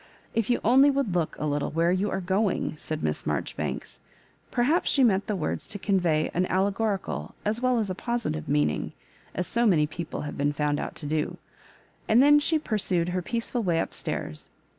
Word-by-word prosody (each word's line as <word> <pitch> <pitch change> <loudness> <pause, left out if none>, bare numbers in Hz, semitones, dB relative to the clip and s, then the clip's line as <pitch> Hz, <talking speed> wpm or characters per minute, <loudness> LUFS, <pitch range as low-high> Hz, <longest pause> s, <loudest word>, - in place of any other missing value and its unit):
If 230 -1 0
you 245 - +3
only 265 +5 +6
would 275 -8 0
look 170 -3 -1
a 150 - -3
little 145 -1 0
where 165 +2 +2
you 190 +3 +1
are - - -1
going," 190 -1 0
said 155 0 -5
Miss 75 -1 -2
Marjori - - -2
banks; - - -4 0.3
— 130 0 -34
perhaps 280 +9 +2
she 275 - +3
meant 200 -4 +3
the 210 - 0
words 175 - -3
to 205 - -3
convey 175 -6 +1
an 180 +1 +1
aUegorical 200 +1 -1
as 215 +2 0
weU 255 -1 +2
as 205 -4 -1
a - - -1
positive 230 - -3
meaning, 75 0 0 0.4
as 180 - 0
so 235 +4 +2
many 160 -7 +4
people 160 +2 -5
have 150 - -6
been' 145 +1 +1
found 145 0 0
out - - -5
to 150 - -7
do 150 +1 -1 0.4
— - - -32
and 220 - +6
then 290 +2 +7
she 315 +2 +2
pursued 190 - 0
her 180 +1 -1
peaceful 235 +5 -2
way 175 -5 +1
up - - -2
stairs. 75 - -3
190 Hz, 205 wpm, -27 LUFS, 155-230 Hz, 0.4 s, then